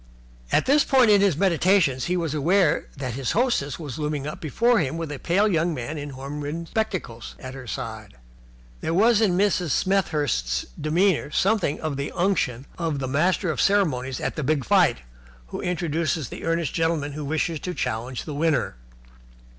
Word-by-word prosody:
At - - +3
this 280 +2 +4
point 255 -5 +4
in 200 -1 +6
his 195 -7 +3
meditations 175 -6 +2
he 180 +1 0
was 165 -4 -2
aware 165 +3 +2
that 130 -3 -4
his 130 +1 -2
hostess 220 - +1
was 150 -4 -7
looming 150 -2 -2
up 150 +5 -6
before 230 - +2
him 155 0 -1
with 165 -3 -4
a 145 - -6
pale 195 +5 +2
young 170 -3 +1
man 130 +4 -5
in 145 0 -6
horn 140 +2 -6
rimmed 165 +3 -5
spectacles 185 - -3
at 130 -1 -8
her 130 -2 -9
side. - - -6 0.6
There 165 - -2
was 225 +3 +4
in 185 -5 +3
Mrs. 190 -4 +1
Smethurst's 145 - 0 0.2
demeanour 165 +1 +2
something 195 -1 +1
of 155 -3 -3
the 140 +1 -3
unction 165 -9 0
of 165 -4 -1
the 135 -1 -3
master 170 +6 +1
of - - -1
ceremonies 135 -11 +1
at - - -3
the 150 - -3
big 145 -2 0
fight - - +3 0.5
who - - -5
introduces 165 -4 -1
the - - -7
earnest 165 -3 0
gentleman 165 -3 0
who 150 +1 -6
wishes 160 +2 -1
to 180 +3 -5
challenge 120 +3 -3
the 150 - -6
winner. 145 - 0
160 Hz, 180 wpm, -24 LUFS, 140-185 Hz, 0.6 s, in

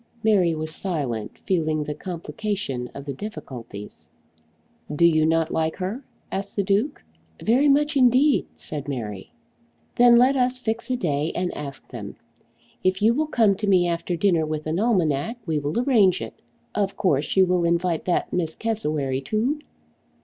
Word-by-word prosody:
Mary 190 -7 +3
was 155 0 -3
silent, 140 - -3
feeling 155 -4 +1
the 150 0 -4
complication 165 - -4
of 140 - -7
the 140 - -4
difficulties. 125 - -9 0.8
"Do 150 +3 +3
you 155 -2 +4
not 165 0 +1
like 160 0 0
her?" 200 +8 -4 0.3
asked 200 +1 -4
the 200 - +1
Duke. 205 +9 0 0.4
"Very 265 +6 +3
much 295 +2 +3
indeed," 260 +2 +4
said 145 -3 -6
Mary. 110 -8 -5 0.6
"Then 240 0 +7
let 255 +3 +5
us 250 -1 +1
fix 230 -1 -3
a 255 - +1
day 155 - -1
and 180 0 -1
ask 140 -2 -7
them. 105 -5 -7 0.7
If 185 +2 +1
you 225 +2 +5
will 305 +5 0
come 225 -8 +3
to 210 - -3
me 180 -3 +4
after 170 +1 -2
dinner 170 -2 +2
with 155 0 -3
an 160 +3 -1
almanac 195 - +1
we 155 -3 0
will 145 +9 -2
arrange 220 -8 +4
it. - - -6 0.4
Of 200 -1 -1
course 150 -6 +1
you 190 - +7
will 180 -1 +1
invite 170 0 0
that 180 - 0
Miss 165 -3 -1
Cassewary 150 -12 -1
too?" 230 - -1
180 Hz, 165 wpm, -24 LUFS, 150-220 Hz, 0.8 s, Then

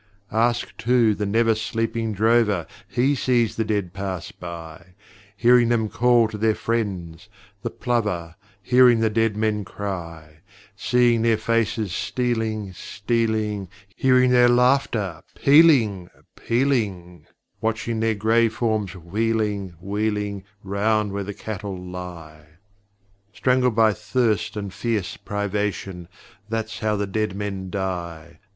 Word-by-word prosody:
Ask, 120 +2 0
too, 115 -2 +3
the 105 0 -3
never 115 +2 +3
sleeping 115 +1 -2
drover: 110 -3 +2 0.2
He 125 +8 +1
sees 120 -4 +1
the 115 - 0
dead 105 -5 -2
pass 95 -2 -5
by; 85 +1 -10 0.4
Hearing 120 +1 +5
them 110 -2 +1
call 120 -1 +3
to 105 - -7
their 110 0 +2
friends 95 -8 -3 0.3
the - - -3
plover, 105 -9 -2 0.3
Hearing 125 -1 +5
the 110 -1 +2
dead 115 -1 +1
men 105 -1 0
cry; 85 -6 -7 0.4
Seeing 120 +2 +2
their 115 -1 +3
faces 115 -3 0
stealing, 110 -5 -2
stealing, 105 0 -2 0.3
Hearing 130 -1 +4
their 125 -1 +6
laughter, 120 - +2
pealing, 135 - +4 0.3
pealing, 105 -9 -1 0.3
Watching 110 +1 -1
their 110 0 +1
grey 110 +2 +3
forms 110 -4 -2
wheeling, 100 +1 -2
wheeling 105 0 -2 0.2
Round 105 +1 0
where 100 0 -2
the 100 +1 -6
cattle 100 -3 -6
lie! 90 -4 -9 0.9
Strangled 125 -1 +2
by 110 -1 +4
thirst 110 0 -1
and 100 -2 -5
fierce 110 -6 -2
privation 100 -3 -3 0.4
That's 110 -1 -3
how 110 -1 0
the 100 0 -1
dead 105 0 -2
men 100 -2 -4
die! 85 -4 -5
110 Hz, 120 wpm, -23 LUFS, 95-115 Hz, 0.9 s, their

